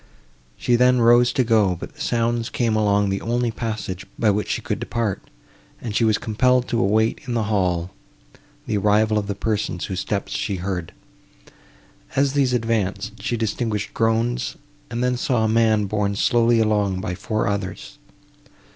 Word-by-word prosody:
She 120 - +2
then 125 +1 +4
rose 120 +1 +5
to 130 - +2
go, 110 -6 +3
but - - -9
the - - -12
sounds 115 0 0
came 115 -3 0
along 105 -1 +2
the 95 0 -2
only 120 0 0
passage, 110 -5 -4
by 110 -2 +3
which 105 +1 -2
she - - 0
could - - -2
depart, 115 -5 -2 0.6
and 110 -4 -5
she 115 - +2
was 110 -2 +3
compelled 125 +3 +1
to 115 - 0
await 110 +1 +1
in 120 - -2
the 115 - +1
hall, 90 -2 0 0.7
the 105 - -1
arrival 105 +2 +3
of 100 - -5
the 100 - -3
persons, 105 -4 -2
whose 95 -1 -4
steps 100 0 -3
she 100 - -2
heard. 90 -2 -4 1.2
As 140 0 +2
these 140 -3 +2
advanced, 105 -4 -1
she 120 - -1
distinguished 110 -1 -2
groans, 115 +2 0 0.3
and 120 0 -2
then 125 0 +1
saw 120 -2 +1
a - - +2
man 110 -1 +3
borne 100 0 -1
slowly 115 +2 +3
along 105 -4 +1
by 95 -2 -3
four 110 +4 -2
others. 100 0 -4
110 Hz, 170 wpm, -22 LUFS, 100-120 Hz, 1.2 s, rose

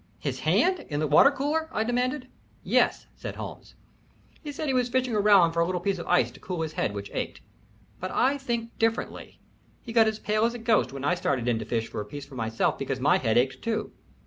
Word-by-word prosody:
"His - - -4
hand? 370 -1 +2
In 145 -1 -2
the 155 - +1
water 150 - +7
cooler?" 295 +3 -1
I 220 - 0
demanded. 250 +3 -1 0.4
"Yes," - - +2
said - - -7
Holmes. - - -9 0.7
"He 295 - -5
said 290 - -4
he 270 - 0
was 250 -1 +1
fishing 255 -1 0
around 200 -5 +5
for 170 - -1
a 170 - +4
little 180 -1 -1
piece 190 +1 -1
of - - -7
ice 180 - +3
to - - -15
cool 180 -3 -3
his 155 -1 -5
head, 105 - -1
which 100 0 -6
ached, - - -4 0.6
but 185 - -4
I 275 +7 +2
think 235 -3 -3
differently. 225 0 -2 0.4
He 230 - -7
got 225 -1 +5
as 220 -1 -1
pale 215 0 0
as 235 +1 +1
a - - -3
ghost 225 -2 +2
when 135 0 -5
I 145 - +3
started 135 -8 -1
in 120 -2 +1
to 110 - -5
fish 115 0 -1
for - - -5
a - - -6
piece 140 +6 -8
for 140 - -16
myself 115 -2 -1
because 135 -1 -2
my 140 +3 +3
head 115 -3 +1
ached 125 +1 +1
too. 225 -1 -2
200 Hz, 235 wpm, -27 LUFS, -, 0.7 s, water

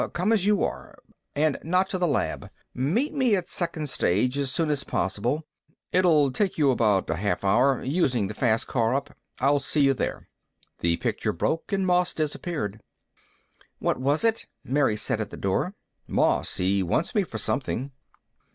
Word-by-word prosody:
Come 185 +6 +1
as 200 -3 +2
you 210 -2 +3
are. - - -4 0.4
And 150 0 +1
not 185 +4 +1
to 185 - -2
the 175 - +2
lab. 150 - -1 0.2
Meet 175 - 0
me 260 -7 +3
at 180 -3 -2
second 165 -5 -2
stage 125 0 +1
as 140 -2 -1
soon 155 +1 0
as 145 -2 -1
possible. 120 +11 -1 0.5
It'll 160 -7 +4
take 195 +7 0
you 145 -4 +4
about 105 -6 +2
a 85 - -1
half 100 -1 -1
hour, 125 +6 +3
using 130 - +1
the 105 - -6
fast 115 -1 +1
car 115 0 +1
up. 140 +1 -4 0.2
I'll 140 +2 +3
see 150 - 0
you 135 -1 +5
there." 130 - -4 0.5
The 85 0 +1
picture - - -1
broke 160 - -2
and 195 -1 +1
Moss 180 -1 +2
disappeared. 145 - -3 1.0
"What - - -1
was 140 - +1
it?" 225 0 +1 0.2
Mary 130 -5 +1
said, - - -1
at - - -4
the - - -9
door. - - -1 0.3
"Moss. - - +1
He 95 +2 +1
wants 95 - 0
me 210 - +3
for 115 - -6
something." 130 +3 -2
140 Hz, 175 wpm, -26 LUFS, 120-175 Hz, 1.0 s, you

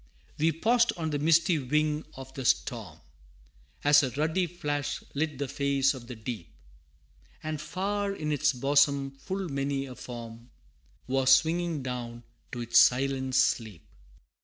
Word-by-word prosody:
We 160 +2 +3
paused 230 +8 +2
on 160 -2 -2
the 145 - -1
misty 165 +2 +3
wing 150 +3 0
of 135 0 -10
the 135 - -6
storm, 110 -9 -1 0.8
As 145 0 +6
a 135 - -1
ruddy 160 +7 0
flash 145 -4 -3
lit 150 0 -2
the 140 0 -2
face 140 0 +1
of 125 -3 -10
the 125 - -7
deep, 110 -7 -7 0.9
And 155 -1 -3
far 200 +5 -2
in 155 -6 -3
its 150 +1 +2
bosom 140 +1 +2
full 185 +8 -5
many 140 -1 -2
a 130 - -8
form 115 -1 -9 0.6
Was 130 0 +1
swinging 160 +3 +3
down 120 -2 -5 0.3
to 120 - -5
its 120 0 +4
silent 130 0 +3
sleep. 115 -7 +1
140 Hz, 145 wpm, -28 LUFS, 130-155 Hz, 0.9 s, As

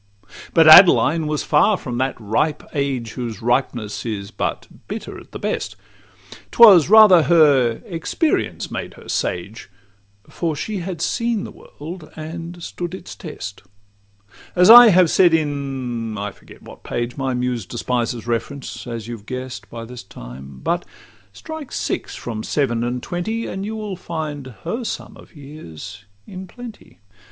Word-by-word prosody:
But 165 -1 +6
Adeline 165 -2 +7
was 150 -1 -1
far 170 +7 +3
from 120 -6 -5
that 130 -1 -1
ripe 115 +8 -1
age, 135 -6 -2
Whose 115 -5 -5
ripeness 120 -4 -1
is 105 -4 -5
but - - -3 0.2
bitter - - -6
at - - -17
the - - -6
best: - - -3 0.7
'Twas 195 -9 +7
rather 210 -5 +8
her 140 -6 +3
experience 165 - -2
made - - -5
her - - -15
sage, 100 +5 -3 0.6
For 165 -3 -3
she 210 +7 -4
had 175 -2 -5
seen 230 -3 -1
the - - -8
world 160 +2 -11
and 165 +2 -8
stood 175 +2 -5
its - - -10
test, 100 - -8 0.9
As 180 +4 +7
I 240 0 +11
have 180 -4 +4
said 175 -3 +5
in—I 125 -8 -3
forget - - -17
what - - -13
page; 120 0 -3
My 135 -2 -2
Muse 125 -5 -2
despises 120 0 -2
reference, 120 0 -4
as 115 -2 -6
you 120 - -5
have 105 0 -20
guess'd 125 -4 -6
By 115 -1 -8
this 125 +1 -9
time;—but 70 - -6 0.5
strike 315 -4 -9
six - - -3
from 110 -3 -5
seven 120 -3 -1
and 120 +1 -3
twenty, 220 +6 -3
And 190 +1 -5
you 215 +2 -4
will 210 -3 -5
find 155 -6 -5 0.2
her 225 +9 -3
sum - - -6
of - - -17
years 100 - -11 0.2
in 185 0 -9
plenty. 240 +2 -12
140 Hz, 150 wpm, -20 LUFS, 115-175 Hz, 0.9 s, I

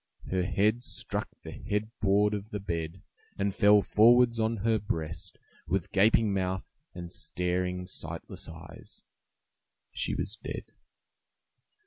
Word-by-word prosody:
Her 95 -1 +2
head 105 +5 +2
struck - - -3
the - - -7
head 105 +1 -3
board 105 +1 +3
of 105 0 -4
the 105 - -4
bed 85 -2 -4 0.3
and 100 0 0
fell 105 0 +6
forwards 120 +2 +5
on 110 +1 +1
her 110 -1 +3
breast, 80 -7 -4 0.3
with 95 0 -1
gaping 105 +1 +4
mouth 95 -1 -1 0.3
and 85 -1 -7
staring, 90 0 -2
sightless - - -6
eyes. 80 +1 -11 0.9
She - - -1
was 105 - -3
dead. - - -5
100 Hz, 125 wpm, -29 LUFS, 90-110 Hz, 0.9 s, fell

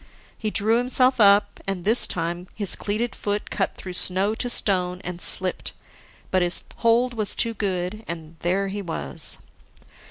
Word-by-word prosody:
He 215 - -3
drew 220 +3 +1
himself 255 +1 +3
up, 200 -1 +4
and 195 -3 -4
this 225 +4 +6
time 175 +1 -4
his 205 -4 +2
cleated 220 +4 -3
foot 205 0 -4
cut 195 - -2
through 185 - -8
snow 190 +3 +1
to 245 +2 -1
stone, 180 -5 +2
and 180 -1 -7
slipped, 185 0 +3 0.6
but 185 - +2
his 175 0 +3
hold 240 +2 +2
was 215 -4 -1
too 230 -1 0
good. 195 0 -3
And 165 -1 -7
there 195 +3 -1
he 200 +1 -5
was. 170 -4 -3
200 Hz, 160 wpm, -23 LUFS, 180-220 Hz, 0.6 s, this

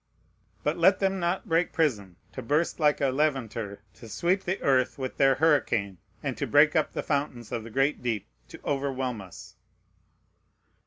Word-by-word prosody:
But 150 +3 0
let 190 +3 +5
them 195 -1 0
not 175 +5 -1
break 165 0 +1
prison 105 - 0 0.2
to 130 - -6
burst 150 +9 0
like 150 -2 +2
a 140 - +3
Levanter, 120 -8 -2
to 115 - -13
sweep 180 - 0
the 185 +2 -1
earth 130 -2 +2
with 130 -2 -5
their 135 -1 +4
hurricane, 120 - +1 0.2
and - - -2
to - - -2
break - - +5
up - - +1
the - - -3
fountains 130 -5 -2
of 115 - -3
the 115 - -9
great 135 +6 0
deep 115 -5 -2 0.2
to - - -12
overwhelm 135 -5 -2
us! 95 -3 -12
135 Hz, 170 wpm, -27 LUFS, 115-160 Hz, 0.2 s, let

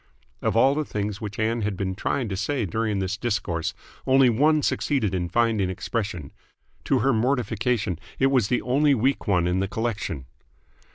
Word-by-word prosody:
Of 110 - 0
all 135 +4 +5
the 155 +1 -1
things 105 -5 -4
which 105 -1 -6
Ann 115 +2 0
had 105 -2 -2
been 95 -1 -2
trying 120 +6 -1
to 95 - -2
say 120 +4 -1
during 110 +2 -1
this 95 +1 -2
discourse, 95 -7 -2 0.3
only 130 -1 +5
one 150 +6 +3
succeeded 120 -10 0
in 90 -2 -1
finding 110 -2 +1
expression. 95 - -4 0.5
To - - +2
her 135 - +4
mortification, 115 - 0 0.2
it 135 0 +3
was 125 -7 +3
the 125 - 0
only 140 +3 +3
weak 130 +2 0
one 90 -4 +2
in 90 +1 +1
the 95 - 0
collection. 105 - -3
110 Hz, 175 wpm, -25 LUFS, 95-125 Hz, 0.5 s, all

